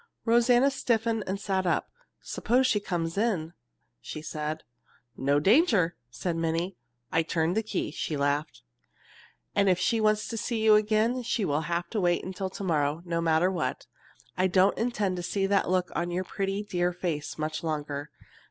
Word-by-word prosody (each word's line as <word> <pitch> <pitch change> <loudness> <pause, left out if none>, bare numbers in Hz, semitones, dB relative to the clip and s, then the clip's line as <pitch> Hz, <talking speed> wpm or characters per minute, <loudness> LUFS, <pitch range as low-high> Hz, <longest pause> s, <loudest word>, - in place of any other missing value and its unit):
Rosanna 240 +3 +4
stiffened 230 -4 0
and 190 +1 -2
sat 190 -2 -1
up. 170 - 0 0.3
"Suppose 250 +4 +1
she 210 - +3
comes 175 -2 -2
in?" 180 -8 0 0.5
she - - -6
said. 155 0 -4 0.5
"No 140 +2 +2
danger!" 200 - +4
said 170 +7 -3
Minnie. 165 +3 -1 0.4
"I 165 - +3
turned 165 +2 0
the 220 - +2
key." 205 -8 -3
She 150 0 -3
laughed. 145 +2 -1 0.9
"If 195 -3 +4
she 225 +4 +1
wants 215 0 +2
to 230 - -4
see 225 +1 -2
you 220 -1 +7
again 215 +4 +3
she 230 -3 -1
will 145 -1 0
have 170 0 -1
to 215 - 0
wait 175 -1 +2
until 190 +1 -4
to 195 - -7
morrow, 155 -2 0
no 170 -1 -1
matter 165 +2 +3
what. 175 -4 -2 0.5
I 185 +2 +2
don't 185 +1 +4
intend 210 -6 -1
to - - -3
see 195 +3 -1
that 200 -2 +2
look 185 -1 +1
on 175 +1 -1
your 180 +2 -1
pretty 195 +2 -2
dear 180 -3 0
face 170 -4 -3
much 155 0 -3
longer. 145 -2 -3
185 Hz, 170 wpm, -28 LUFS, 165-215 Hz, 0.9 s, you